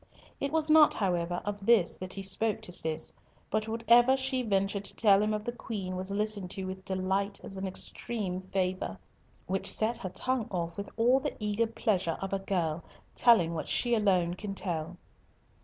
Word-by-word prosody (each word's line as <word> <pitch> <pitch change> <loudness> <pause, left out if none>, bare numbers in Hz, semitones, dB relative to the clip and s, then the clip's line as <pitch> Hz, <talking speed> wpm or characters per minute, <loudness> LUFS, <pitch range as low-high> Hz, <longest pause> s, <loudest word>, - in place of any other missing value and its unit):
It 280 - -2
was 315 -1 +1
not, 310 -1 +6
however, 175 -3 -1
of 205 -1 -4
this 210 -5 +4
that 185 0 -5
he 195 - -5
spoke 205 +2 +1
to - - -6
Cis, 160 -2 +2 0.4
but 215 +1 0
whatever 235 +3 +4
she 265 -1 0
ventured 195 -3 0
to - - -1
tell 200 -3 +5
him 210 0 +1
of 210 0 -2
the 240 - -3
Queen 200 -6 -5
was 185 +1 -4
listened 205 -2 -2
to 190 +1 -4
with 190 0 -6
delight 190 +2 -1
as 195 - -8
an 190 0 -3
extreme 190 0 -4
favour, 185 - -2 0.5
which 190 +1 -1
set 225 +2 0
her 225 -5 -5
tongue 250 +4 -1
off 170 -3 -3
with 200 0 -6
all 245 +3 +4
the 290 +2 -4
eager 210 +1 0
pleasure 215 -7 0
of 195 0 -4
a 195 - +1
girl, 170 -5 -1 0.3
telling 180 -9 +4
what 160 - -4
she 240 -1 +1
alone 185 -6 +2
can 195 +2 -6
tell. 175 -2 -4
195 Hz, 190 wpm, -30 LUFS, 185-225 Hz, 0.5 s, not